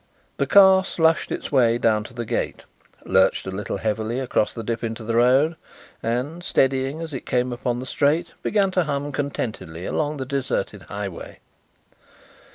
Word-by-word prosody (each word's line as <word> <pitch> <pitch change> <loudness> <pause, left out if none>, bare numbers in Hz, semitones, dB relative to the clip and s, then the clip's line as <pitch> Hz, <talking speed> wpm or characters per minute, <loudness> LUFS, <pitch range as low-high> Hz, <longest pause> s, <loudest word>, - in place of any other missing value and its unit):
The - - 0
car 190 -1 +7
slushed 165 -4 +1
its - - -4
way 120 -4 +4
down 110 -3 +2
to 125 - -11
the 120 -1 -4
gate, - - -2 0.4
lurched 95 0 +3
a 95 - -4
little 100 +2 -4
heavily 110 +2 -2
across 125 -5 0
the 115 - -6
dip 115 +1 -3
into 115 0 -4
the 115 +1 -2
road, 130 +7 +4 0.5
and, 130 +9 -2
steadying 135 +1 +1
as 160 -2 -6
it 130 - -6
came 125 0 0
upon 120 0 -2
the 130 - -5
straight, 150 +6 +1
began 200 -2 +1
to 180 -2 +1
hum 145 0 -2
contentedly 110 - -4
along 150 -1 -1
the 130 - -4
deserted 130 -7 -2
highway. 100 -3 -6
130 Hz, 165 wpm, -23 LUFS, 115-150 Hz, 0.5 s, car